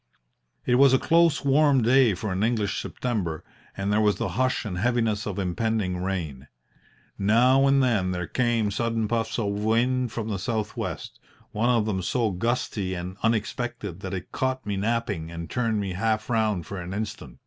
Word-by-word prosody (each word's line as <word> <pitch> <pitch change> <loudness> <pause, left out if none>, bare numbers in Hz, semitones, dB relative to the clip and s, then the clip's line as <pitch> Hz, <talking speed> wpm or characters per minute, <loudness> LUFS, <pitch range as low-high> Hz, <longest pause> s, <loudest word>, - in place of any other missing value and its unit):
"It 125 0 +3
was 135 -1 +6
a - - +6
close, 165 -1 +3
warm 140 -2 +4
day 120 -3 +4
for 100 +2 -4
an 95 +1 -1
English 110 -2 0
September, 100 -11 -3 0.3
and 100 +1 -1
there 105 - +3
was 105 -1 +3
the - - -2
hush 130 0 0
and 90 -4 -4
heaviness 110 -1 0
of 100 -2 -4
impending 95 -1 -1
rain. 80 -8 -4 0.7
Now 125 +7 +4
and 135 0 +4
then 110 -7 +1
there 90 -1 -2
came 115 -1 0
sudden 115 +1 -1
puffs 115 0 -1
of 110 -4 0
wind 115 +4 +1
from 115 -2 -4
the 105 -4 -2
south 110 +2 -2
west - - -5 0.3
one 110 +3 +1
of 115 -3 +3
them 100 -3 -1
so 110 +4 0
gusty 100 -2 -2
and 90 +1 -5
unexpected 115 -3 -2
that 95 0 -5
it 90 - -7
caught 130 0 -2
me 100 -1 -2
napping 105 -5 -1
and 85 -1 -7
turned 115 -3 0
me 100 -2 -3
half 110 +4 -1
round 110 -6 +1
for 100 -2 -6
an 90 +2 -6
instant. 105 - -6
110 Hz, 180 wpm, -25 LUFS, 95-120 Hz, 0.7 s, was